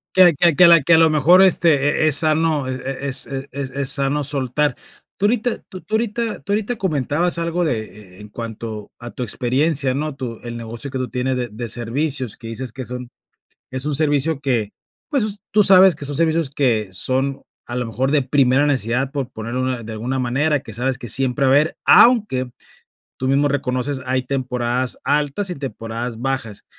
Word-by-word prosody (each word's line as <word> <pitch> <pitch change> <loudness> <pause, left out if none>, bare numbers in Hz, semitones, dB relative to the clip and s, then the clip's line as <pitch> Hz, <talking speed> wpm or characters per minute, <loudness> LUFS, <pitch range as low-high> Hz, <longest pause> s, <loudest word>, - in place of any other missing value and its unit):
Que 180 -4 +6
que 170 +1 +3
que 180 - +5
a - - +9
la 170 - +8
la 155 - -3
que 165 - +4
a 160 - +7
lo 160 -1 +5
mejor 155 +5 +5
este 175 -4 +5
eh 145 +2 +1
eh - - +4
es 150 - +6
sano 155 -3 +3
eh 130 0 -4
eh 135 -1 -3
es 135 0 +1
eh 135 0 -6
es 135 -1 -5
es 140 0 -2
sano 140 +1 +1
soltar, 140 0 0 0.4
tú 200 - 0
ahorita 235 +2 0
tú 185 - -9
tú 215 - -4
ahorita 230 0 -2
tú 200 - -6
ahorita 215 +3 -1
comentabas 170 - +1
algo 170 +1 -1
de 120 -8 0
eh 105 -4 -13
eh - - -9
en 105 - -12
cuanto 110 -1 -7
a 120 0 -8
tu 125 - -5
experiencia, 130 +4 0
¿no?, 150 0 -3
tu 120 -4 -6
el 120 -1 -6
negocio 115 +3 -7
que 130 - -4
tú 125 -2 -3
tienes 130 +2 -2
de 125 -1 -2
de 115 +3 -6
servicios, 125 +2 -1
que - - -14
dices 120 +1 -6
que 130 -1 -7
son 125 0 -7 0.6
es 130 +2 -2
un 150 - -1
servicio 145 0 +1
que, 120 -7 -1 0.4
pues, 215 -8 -1
tú 210 0 +5
sabes 190 -2 +7
que 145 - -9
son 145 0 -4
servicios 160 -2 +1
que 120 -8 0
son 130 +8 -2 0.2
a 120 - -5
lo 125 -1 -2
mejor 130 +4 -2
de 145 -2 +2
primera 135 +1 +2
necesidad 130 -1 0
por 135 -3 -4
poner 115 0 -7
una 130 -2 -2
de 110 - -7
alguna 120 +5 -3
manera, 135 +4 0
que 110 - -10
sabes 125 +3 -2
que 120 - -8
siempre 135 +3 0
va 130 - +4
a - - +5
haber, 150 +3 +2
aunque 210 - +4 0.7
tú 130 - -2
mismo 140 +2 +2
reconoces, 130 0 -2
hay 130 0 -1
temporadas 125 -1 -2
altas 150 +7 0
y - - -3
temporadas 120 -4 -6
bajas. 130 -5 -4
135 Hz, 215 wpm, -20 LUFS, 125-155 Hz, 0.7 s, a